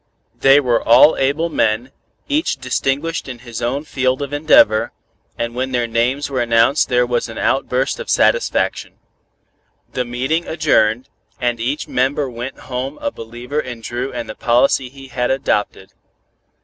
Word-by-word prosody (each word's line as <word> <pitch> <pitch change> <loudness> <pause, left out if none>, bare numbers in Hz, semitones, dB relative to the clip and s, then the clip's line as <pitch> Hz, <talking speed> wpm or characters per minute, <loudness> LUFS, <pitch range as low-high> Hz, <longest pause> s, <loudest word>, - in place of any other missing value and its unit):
They 135 +1 +6
were 125 -4 +1
all 120 +6 +6
able 145 +5 +1
men, 115 -3 0 0.4
each 300 +3 0
distinguished 135 +5 -2
in 125 - -6
his 120 -2 -6
own 130 +5 -1
field 130 -2 -1
of 140 0 -6
endeavor, 145 -7 +4 0.4
and 115 0 -3
when 130 +1 -3
their 120 -1 +1
names 120 +5 0
were 130 -3 -2
announced 115 +4 +3
there 125 0 +3
was 120 -1 -1
an 115 - -8
outburst 130 0 0
of - - -7
satisfaction. - - +1 1.0
The 125 - -1
meeting 130 +8 -2
adjourned, 130 -7 +1 0.3
and 120 -2 -1
each 130 +6 -2
member 135 +3 0
went 120 +3 -7
home 130 +3 -5
a 285 - -2
believer 120 - -5
in 125 -5 -6
Dru 120 +4 -4
and 120 -2 -5
the - - -6
policy 125 +2 +2
he 135 0 -13
had 125 -1 -1
adopted. 105 -7 -1
125 Hz, 155 wpm, -18 LUFS, 120-140 Hz, 1.0 s, They